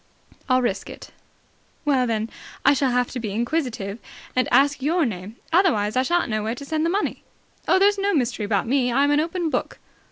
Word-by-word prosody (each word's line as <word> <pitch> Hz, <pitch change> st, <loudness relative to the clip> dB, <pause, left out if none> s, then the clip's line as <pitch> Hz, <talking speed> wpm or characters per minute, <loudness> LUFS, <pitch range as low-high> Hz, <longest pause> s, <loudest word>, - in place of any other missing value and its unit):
"I'll 255 Hz, 0 st, +3 dB
risk 240 Hz, -, -2 dB
it." -, -, -11 dB, 0.7 s
"Well, 265 Hz, -4 st, +2 dB
then, 225 Hz, -1 st, -2 dB, 0.3 s
I 280 Hz, -, +7 dB
shall 275 Hz, -1 st, +1 dB
have 250 Hz, 0 st, 0 dB
to 255 Hz, -, -4 dB
be 220 Hz, -3 st, -4 dB
inquisitive 235 Hz, -4 st, -2 dB, 0.4 s
and 255 Hz, -, +2 dB
ask 280 Hz, +3 st, +3 dB
your 320 Hz, +4 st, +2 dB
name. 205 Hz, -1 st, -5 dB, 0.2 s
Otherwise 275 Hz, -, +3 dB
I 255 Hz, -, +4 dB
shan't 345 Hz, +6 st, +1 dB
know 215 Hz, -1 st, -1 dB
where 220 Hz, +3 st, -2 dB
to 280 Hz, -, -9 dB
send 315 Hz, +2 st, 0 dB
the -, -, +1 dB
money." 400 Hz, +4 st, -1 dB, 0.5 s
"Oh, -, -, +5 dB
there's 400 Hz, +1 st, +4 dB
no 400 Hz, +1 st, +1 dB
mystery 245 Hz, -, 0 dB
about 205 Hz, -1 st, 0 dB
me. 250 Hz, 0 st, +1 dB
I'm 280 Hz, +4 st, +3 dB
an 290 Hz, -, +3 dB
open 330 Hz, +1 st, -1 dB
book." -, -, -2 dB
260 Hz, 200 wpm, -23 LUFS, 230-315 Hz, 0.7 s, I